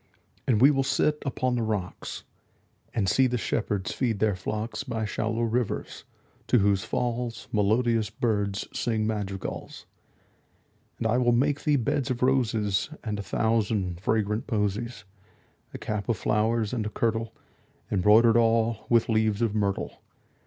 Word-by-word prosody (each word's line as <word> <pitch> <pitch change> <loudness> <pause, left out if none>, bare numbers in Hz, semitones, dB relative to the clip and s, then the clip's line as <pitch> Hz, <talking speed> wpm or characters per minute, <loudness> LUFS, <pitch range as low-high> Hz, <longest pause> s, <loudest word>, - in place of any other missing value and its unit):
And 115 -5 +3
we 135 +5 +7
will 135 -2 +1
sit 150 +2 +1
upon 130 -1 0
the 120 - 0
rocks, 105 -5 -4 0.6
5 - - -35
And 100 -4 +1
see 130 +6 +4
the 125 0 -1
shepherds 105 -4 -1
feed 120 -5 -1
their 105 -1 +1
flocks 110 +7 -4
By 115 -5 -3
shallow 110 +3 -1
rivers, 115 -1 -2 0.4
to - - +4
whose 100 -2 +2
falls 120 0 -2
Melodious 110 +1 +2
birds 105 -3 -1
sing 110 -2 0
madrigals. 100 -3 -4 1.1
And - - -4
I 115 +3 +2
will 120 -1 +3
make 140 +4 +1
thee 150 -1 +4
beds 140 +2 0
of 125 -1 -1
roses 115 -6 +1
And 105 -2 -3
a - - -1
thousand 100 -3 0
fragrant 105 +1 0
posies; 110 0 -2 0.7
10 - - -13
A - - -3
cap 105 +1 -4
of 115 - +1
flowers, 110 +1 +1
and 110 -4 -1
a - - -2
kirtle 115 0 -1 0.6
Embroider'd 110 +4 +5
all 115 -1 +2
with 115 -1 +4
leaves 110 -1 +1
of 110 -3 +1
myrtle. 100 -2 -2
110 Hz, 150 wpm, -27 LUFS, 105-120 Hz, 1.1 s, we